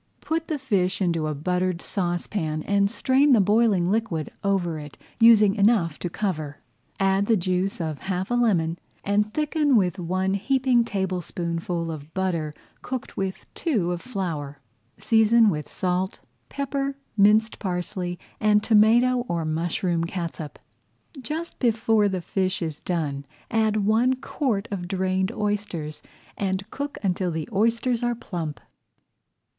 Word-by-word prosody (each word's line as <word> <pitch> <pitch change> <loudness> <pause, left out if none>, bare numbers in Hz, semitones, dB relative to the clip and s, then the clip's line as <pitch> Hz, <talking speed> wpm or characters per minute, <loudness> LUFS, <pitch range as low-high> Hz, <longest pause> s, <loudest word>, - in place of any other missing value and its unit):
Put 325 +1 -2
the 310 - -1
fish 200 -9 0
into 170 -5 0
a 155 - -2
buttered 180 +4 0
[Page - - -12
103] - - -10
sauce 175 -3 -1
pan 155 -6 -2
and 200 0 +2
strain 265 +5 +3
the 230 - +6
boiling 205 -3 +3
liquid 210 -8 -1
over 180 -5 0
it, 150 -1 -10 0.2
using 220 -3 +7
enough 200 -7 +2
to 175 - -3
cover. 155 -7 -3 0.4
Add 195 +1 +2
the 225 - +4
juice 185 +2 -1
of 155 -3 -3
half 190 +2 -3
a - - +2
lemon, 180 -9 +2 0.2
and 210 +1 +1
thicken 300 0 +1
with 185 -4 +2
one 185 +2 0
heaping 250 +3 +2
tablespoonful 175 -4 -2
of 155 -1 -8
butter 170 -5 -1 0.3
cooked 255 -1 -5
with 190 -1 -3
two 215 - 0
of 175 -1 -3
flour. 165 - -4 0.4
Season 225 -1 +4
with 150 -3 -4
salt, 185 0 -1 0.3
pepper, 275 0 -2 0.2
minced 215 +2 +4
parsley, 180 -1 -3 0.2
and 210 -1 +3
tomato 235 +4 +5
or 170 -2 -1
mushroom 165 +2 -1
catsup. 170 -4 -5 0.6
Just 320 +5 -5
before 225 -3 +3
the 185 -2 -2
fish 185 +1 -1
is 155 -2 -4
done 150 -6 -2 0.3
add 215 -2 +2
one 235 +5 +3
quart 250 -5 -2
of 180 -3 -4
drained 190 +1 0
oysters 205 -8 -3 0.4
and 195 0 -1
cook 285 +1 -4
until 185 -1 0
the 160 -2 -3
oysters 230 +3 +1
are 240 0 0
plump. 165 - -5
195 Hz, 145 wpm, -25 LUFS, 175-225 Hz, 0.6 s, using